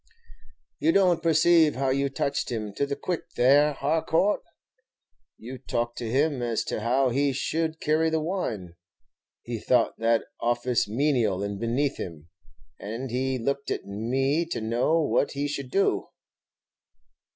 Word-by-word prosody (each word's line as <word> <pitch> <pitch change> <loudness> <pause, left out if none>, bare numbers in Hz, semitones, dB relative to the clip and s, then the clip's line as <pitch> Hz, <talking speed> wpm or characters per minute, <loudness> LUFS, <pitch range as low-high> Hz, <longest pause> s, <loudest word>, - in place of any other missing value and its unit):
"You 325 - +3
don't 180 - +3
perceive 165 -1 +4
how 135 +1 0
you 140 +1 +1
touched 135 0 -2
him 105 -3 -4
to 140 - -1
the 140 - -2
quick 175 +4 -3
there, 145 +4 +5
Harcourt? 160 +7 +1 1.0
You 125 +3 -9
talked 120 -2 -3
to 115 - -4
him 140 +2 +1
as 115 -2 -1
to - - -3
how 130 +4 +2
he 140 +3 +1
should 160 +4 -2
carry 155 +2 +2
the 160 0 0
wine; 125 - -3 0.7
he 120 -1 -4
thought 120 +1 +1
that 115 0 +2 0.2
office 120 0 0
menial 115 -6 +1
and 100 -1 -4
beneath 125 +5 0
him, 80 -2 -8 0.5
and 115 +5 -5
he 130 +1 -1
looked 140 +3 -2
at - - -3
me 130 +10 0
to 170 - -3
know 120 +9 +1
what 150 -2 +1
he 145 +1 -2
should 140 -2 -5
do." 195 +8 +1
135 Hz, 150 wpm, -26 LUFS, 115-150 Hz, 1.0 s, there